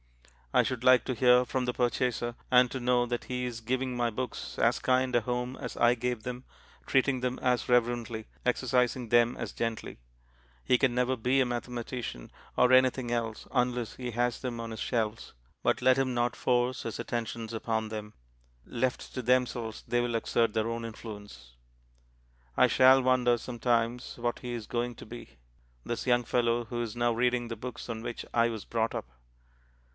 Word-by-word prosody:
I - - +5
should 125 -2 -3
like 130 -1 +6
to 130 - -1
hear 125 0 +5
from 130 +1 -1
the 125 0 -1
purchaser, 120 -1 0
and 125 0 +5
to 130 - -3
know 125 0 +2
that 120 0 -3
he 125 0 -3
is 120 -2 -5
giving 130 +2 -1
my 120 -1 +1
books 125 +2 -5
as - - +2
kind 130 -1 +1
a 120 - +4
home 125 +2 -2
as 125 -3 -6
I 120 0 +5
gave 125 -1 -3
them, 125 +1 -5 0.4
treating 135 -1 +2
them 125 0 -1
as 125 -1 0
reverently, 120 -2 +1 0.2
exercising 125 0 +1
them 120 +1 +4
as - - -5
gently. 115 - -4 0.7
He 125 - +4
can 130 -1 +2
never 125 +1 +1
be 125 +3 +1
a 130 - +4
mathematician, 120 - -5 0.3
or 125 0 +5
anything 130 -1 +4
else, 115 -2 -2
unless 125 -2 0
he 125 -1 -5
has 120 +1 -1
them 125 -3 -4
on 115 0 -5
his 110 - -6
shelves, 115 -2 -2 0.3
but - - +1
let 130 0 +5
him 130 -1 +1
not 120 0 +1
force 125 0 +1
his 115 - -5
attentions 115 -1 -4
upon 110 -1 -1
them. 105 -1 -6 0.5
Left 125 +1 -2
to 130 - -3
themselves 125 -2 0
they 120 0 +2
will 120 -1 -1
exert 115 -1 +1
their 110 0 0
own 115 0 -3
influence. 105 - -9 1.0
I - - +6
shall 130 0 +6
wonder 125 -1 +3
sometimes 120 0 -1
what 120 0 -2
he 125 - -6
is 115 -3 -5
going 120 0 -2
to - - -11
be, 120 - -11 0.5
this 120 - -4
young 120 -1 +3
fellow 120 0 +1
who 120 +1 -4
is 115 -2 -4
now 120 0 +1
reading 120 +1 +1
the 115 - -5
books 125 +3 -7
on 115 -2 -4
which 120 0 -5
I 115 0 +3
was 110 -3 -6
brought 115 -1 -1
up. - - -3
120 Hz, 185 wpm, -29 LUFS, 115-125 Hz, 1.0 s, like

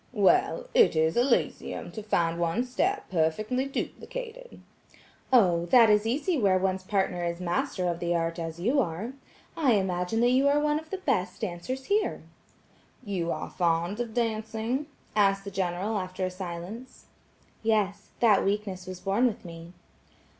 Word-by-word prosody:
"Well, 365 - +3
it 475 -2 +5
is 160 +1 +2
Elysium 245 +1 0
to 215 - -6
find 170 -5 0
one's 200 +10 -1
step 390 +10 0
perfectly 205 +10 0
duplicated." - - -6 0.7
"Oh, 175 -9 +4
that 230 +2 +7
is 210 +1 +3
easy 290 +7 0
where 195 -4 +4
one's 190 0 0
partner 190 -2 0
is 170 0 -2
master 180 +1 -1
of 170 -1 -1
the 175 0 0
art 165 +1 -1
as 165 0 -5
you 245 +11 +2
are. 205 +3 -2 0.4
I 280 -7 +3
imagine 190 +1 0
that 240 +1 +4
you 265 +2 +4
are 285 +1 +4
one 300 0 +1
of 315 0 -14
the 385 - -3
best 230 - -1
dancers 220 +7 -4
here." 415 +1 0 0.8
"You 185 -6 -2
are - - -4
fond 170 +3 0
of 235 -2 -4
dancing?" 225 +3 -1 0.3
asked 195 -1 +3
the 200 - -7
General, 190 +3 -1
after 185 0 -3
a 185 - -3
silence. 185 +7 -8 0.6
"Yes; 210 -2 0
that 215 -4 +5
weakness 195 -2 -2
was 185 -1 -6
born 205 +7 +2
with 215 -5 -5
me." 165 0 -9
205 Hz, 160 wpm, -28 LUFS, 175-250 Hz, 0.8 s, that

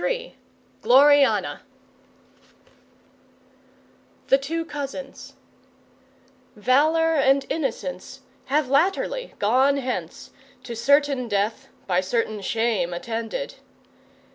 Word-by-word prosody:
GLORIANA 280 +2 +4 2.7
The 270 - +6
Two 325 +4 -3
Cousins 280 -3 -7 1.2
Valour 310 +9 +2
and 275 -2 +3
Innocence 250 - -4 0.2
Have 290 +1 0
latterly 385 - 0
gone 260 +7 +2
hence 245 -11 -5 0.3
To 235 - -7
certain 275 +1 +2
death 215 +5 -2 0.2
by 180 -1 +1
certain 215 +1 -2
shame 200 -4 -1
attended. 230 - -5
265 Hz, 75 wpm, -23 LUFS, 225-285 Hz, 2.7 s, The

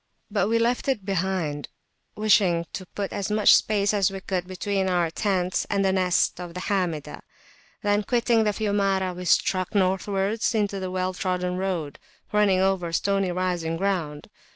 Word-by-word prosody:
But 200 -2 +1
we 230 +1 +2
left 235 +3 0
it 240 -8 -1
behind, 180 -6 -2 0.5
wishing 195 -5 +3
to 185 - -6
put 200 +1 -5
as 200 -1 -3
much 210 0 +5
space 205 -1 +2
as 200 -3 +2
we 195 0 -6
could 185 -2 -3
between 190 +1 -1
our 175 -3 +1
tents 185 -1 -1
and 195 -1 +1
the 190 - +3
nests 180 -2 +1
of 175 -1 -8
the - - -4
Hamidah. 180 -7 -2 0.6
Then 205 0 +2
quitting 235 +1 +2
the 215 - +2
Fiumara, 195 -3 0
we 180 +1 -7
struck 185 +3 +1
Northwards 195 +4 0
into 200 -3 -1
a 185 - -3
well 185 0 -2
trodden 180 -1 -2
road 180 -7 -3 0.3
running 210 -3 +3
over 190 -3 0
stony 195 +2 0
rising 175 -2 -1
ground. 165 -6 -2
190 Hz, 165 wpm, -25 LUFS, 180-205 Hz, 0.6 s, much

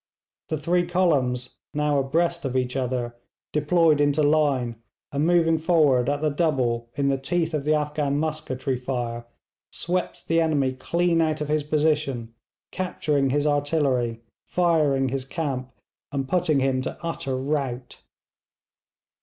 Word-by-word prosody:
The 155 - -1
three 175 +4 +1
columns, 135 -9 +1 0.2
now 150 -1 +2
abreast 170 +5 0
of 130 -2 -1
each 125 0 -1
other, 125 -2 -2 0.4
deployed 155 0 +3
into 145 +1 +3
line, 140 -6 +2 0.3
and 145 +3 +1
moving 165 -2 +3
forward 150 -6 +3
at 145 0 -1
the 155 - +2
double 130 -7 0
in 140 0 +1
the 135 -1 0
teeth 165 +3 -1
of 145 -2 -2
the 155 +1 +3
Afghan 150 -1 -1
musketry 145 -4 -2
fire, 120 -2 -3 0.4
swept 180 +1 -3
the 165 0 +3
enemy 145 -5 +1
clean 170 +6 +1
out 155 -1 0
of 150 -1 -3
his 155 0 +2
position, 150 -6 0 0.4
capturing 150 -7 0
his 145 +2 +1
artillery, 140 -6 +1 0.3
firing 150 -7 +2
his 135 +1 -2
camp, 135 -3 -4 0.4
and 135 -2 -2
putting 170 -5 +2
him 130 -1 +1
to 130 - -5
utter 140 -6 -3
rout. 130 -2 -3
145 Hz, 140 wpm, -25 LUFS, 130-160 Hz, 0.4 s, deployed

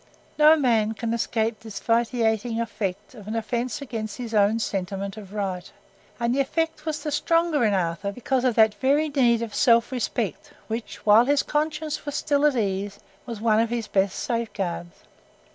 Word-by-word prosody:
No 305 +1 +8
man 230 -7 +2
can 230 0 -2
escape 225 -1 -1
this 220 -3 -8
vitiating 230 -1 0
effect 210 -3 -4
of 210 -5 -12
an 220 - -3
offence 240 +4 -2
against 220 -5 -5
his 240 -3 -6
own 210 +1 +3
sentiment 195 -2 -3
of 205 -3 -11
right, 195 -4 -4 0.5
and 235 0 +1
the 275 - 0
effect 320 +3 -1
was 310 -1 -3
the 300 - -2
stronger 310 0 +2
in 210 -3 +3
Arthur 180 +2 -1
because 250 +3 -1
of 250 -3 +2
that 220 -2 +5
very 285 +6 +1
need 240 -5 +2
of 225 -3 -6
self 235 0 +3
respect 250 -2 -3
which, 225 +1 -6
while 215 +3 +6
his 285 +1 +2
conscience 305 0 -2
was 290 -1 -5
still 290 0 +2
at 290 - +1
ease, 200 -2 -2 0.3
was 230 -3 -6
one 220 -1 +3
of 230 0 +1
his 235 -1 -2
best 195 -1 0
safeguards. 195 -8 -3
230 Hz, 180 wpm, -24 LUFS, 210-270 Hz, 0.5 s, No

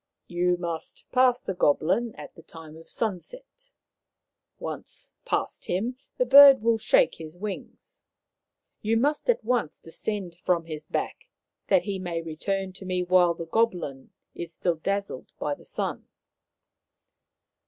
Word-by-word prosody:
" - - -60
You 175 0 +1
must 170 -2 -5
pass 250 -1 +4
the 195 - -4
goblin 180 +8 +1
at - - -10
the 165 - -14
time 160 -1 -12
of 165 0 -14
sunset. - - -5 0.9
Once - - -6
past - - -2
him, 230 +8 -2 0.2
the 250 - +2
Bird 275 -1 +9
will 230 -1 +3
shake - - +3
his 160 +1 -9
wings. 200 0 -8 0.8
You 225 +2 +1
must 295 - 0
at 480 - +3
once 235 -8 0
descend 180 +1 -4
from 170 -2 +1
his 155 -2 -7
back, - - -3 0.4
that - - +4
he 200 -2 -3
may 175 -2 -3
return 185 +4 -3
to 190 - -10
me 180 -1 -1
while 180 -1 +4
the 165 - -6
goblin 170 -9 -1 0.2
is 170 -1 -6
still 170 0 -1
dazzled 200 -5 -3
by 145 - -1
the - - -12
sun." - - -4
185 Hz, 145 wpm, -26 LUFS, 165-230 Hz, 0.9 s, Bird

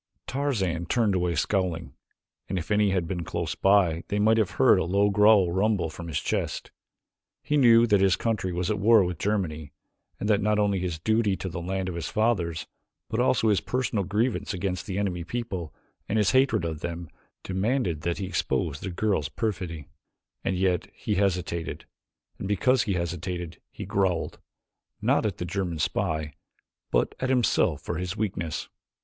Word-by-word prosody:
Tarzan 95 - -1
turned 110 -1 +2
away 90 -2 0
scowling, 90 0 -1 0.6
and 95 - -1
if 85 +3 -5
any 105 0 +3
had 90 -3 0
been 90 -1 -3
close - - -3
by 95 -4 +3
they 105 - -1
might 110 +2 +4
have 105 - +2
heard - - +6
a - - +1
low 100 +4 +2
growl 105 -3 +5
rumble 95 -3 +1
from 85 +2 -8
his 75 -3 -1
chest. - - -3 0.7
He 150 - 0
knew 120 -4 +6
that 105 -4 +3
his 95 -2 +4
country 110 -5 -1
was 90 +3 -1
at 105 - -1
war 110 0 +6
with 90 -2 -3
Germany 80 -8 -2 0.5
and 105 - -2
that 105 -1 +3
not 105 0 +2
only 100 -2 +2
his 90 -3 -2
duty 110 +3 +1
to 95 - -5
the 85 0 -5
land 95 +2 -2
of 90 - -3
his 85 -1 -4
fathers, 90 -8 0 0.4
but 110 - -2
also 125 -2 +3
his 105 - +3
personal 125 -5 -1
grievance 105 +3 -1
against 90 -1 -3
the 95 -2 -3
enemy 95 -4 -1
people 95 -6 -4 0.4
and 110 - +1
his 105 -2 +3
hatred 130 -9 +3
of 80 -2 -3
them, 85 +1 -5 0.4
demanded 95 - -1
that 85 +1 -1
he 100 - -3
expose 70 -5 -1
the - - -5
girl's 90 -5 0
perfidy, 90 -7 -3 0.6
and 95 - 0
yet 90 -2 0
he 105 - -2
hesitated, 90 -4 -1 0.5
and 95 - -4
because 120 +6 +3
he 100 - -1
hesitated 85 0 -4
he - - -8
growled 95 -4 0 0.6
not - - +2
at 100 - -4
the 90 - -3
German 90 -2 -2
spy 80 -1 -1 0.6
but - - +1
at 130 - -1
himself 125 -3 +2
for 85 - -3
his 90 +3 -4
weakness. 90 -7 -3
95 Hz, 180 wpm, -26 LUFS, 85-105 Hz, 0.7 s, heard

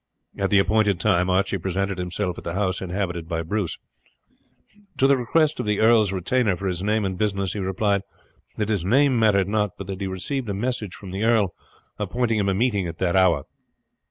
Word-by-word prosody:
At 95 -1 -1
the 100 - +4
appointed 100 -2 +2
time 90 -3 +2
Archie 95 +1 +1
presented 95 +2 -2
himself 90 0 -3
at - - -13
the 85 - -4
house 95 -2 0
inhabited 90 -3 -3
by 85 -1 -2
Bruce. 95 0 -2 1.2
To 135 - +3
the 140 0 +5
request 155 +5 +1
of - - -3
the 105 -1 +1
earl's 110 -3 +4
retainer 100 +3 +1
for 100 - -7
his 90 -2 -2
name 105 +1 +1
and 95 -1 -3
business 100 -3 0
he 105 - -4
replied 100 +1 0 0.6
that 105 -1 -1
his 100 -6 0
name 130 +5 +3
mattered 100 -4 +3
not, 105 -2 -1
but 100 - -6
that 95 0 -6
he - - -1
had - - -4
received 120 +6 -3
a 100 - -2
message 115 -2 -3
from 95 -3 -10
the 95 +3 -3
earl 110 -6 +2 0.5
appointing 110 +2 0
him 100 -1 +1
a 95 - +1
meeting 100 -4 +1
at 80 -1 -7
that 90 -1 0
hour. 90 -7 +4
100 Hz, 210 wpm, -23 LUFS, 95-110 Hz, 1.2 s, the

